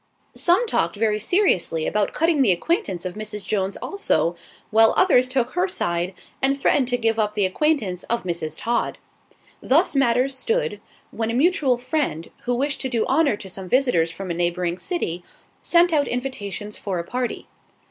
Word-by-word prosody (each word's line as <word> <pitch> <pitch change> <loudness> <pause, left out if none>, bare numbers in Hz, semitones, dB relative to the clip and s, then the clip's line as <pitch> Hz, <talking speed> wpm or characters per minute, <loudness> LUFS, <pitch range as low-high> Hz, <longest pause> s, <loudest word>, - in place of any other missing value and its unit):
Some 360 +7 +3
talked 170 - 0
very 215 0 +1
seriously 195 - +1
about 210 -1 0
cutting 325 -2 +2
the 230 -7 +5
acquaintance 190 - -1
of 180 - -3
Mrs. 210 0 -5
Jones 195 -2 -1
also, 400 - 0 0.4
while 225 +1 +5
others 255 -9 +5
took 255 -1 -1
her 360 +2 +1
side 180 - -2 0.3
and 275 +1 +1
threatened 270 -1 +2
to 245 -1 0
give 225 -1 0
up 210 -1 0
the 205 - +2
acquaintance 200 - 0
of 235 +1 -2
Mrs. 165 -3 -4
Todd. 235 0 -1 0.6
Thus 305 +4 +2
matters 265 0 +2
stood, 470 - -1 0.3
when 225 -1 -2
a 230 - -1
mutual 275 -3 +2
friend, 250 - -2
who 245 0 +1
wished 275 +3 -1
to 260 - -2
do 235 -3 0
honour 280 -5 +2
to 200 - -10
some 185 0 -7
visitors 245 -11 +2
from 185 +2 -6
a - - 0
neighbouring 175 +1 -1
city, 180 - -3 0.4
sent 345 0 +4
out 290 -3 +2
invitations 210 -5 -4
for 195 -3 -3
a 170 - -2
party. 245 +7 -4
235 Hz, 175 wpm, -23 LUFS, 190-280 Hz, 0.6 s, the